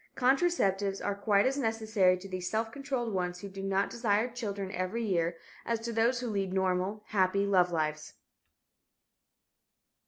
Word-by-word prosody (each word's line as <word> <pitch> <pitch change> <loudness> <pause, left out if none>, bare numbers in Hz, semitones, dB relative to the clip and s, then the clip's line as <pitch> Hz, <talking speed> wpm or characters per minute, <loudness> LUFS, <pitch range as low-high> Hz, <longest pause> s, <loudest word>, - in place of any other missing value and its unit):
Contraceptives 245 - +2
are 205 - +1
quite 200 0 +2
as 270 +2 +1
necessary 220 -6 +2
to 190 +2 -10
these 185 -1 -4
"self 225 +2 -1
controlled" 265 -4 -3
ones 180 -1 -2
who 200 - -6
do 195 0 -8
not 195 0 0
desire 225 -1 +1
children 205 -6 -4
every 200 +5 -2
year 170 -5 0 0.3
as 230 -1 -1
to 230 0 -4
those 235 +2 +2
who 250 - -3
lead 200 -4 -1
normal, 190 +2 0
happy 200 -1 +2
love 180 -3 +3
lives. 155 -2 -2
200 Hz, 155 wpm, -30 LUFS, 185-230 Hz, 0.3 s, love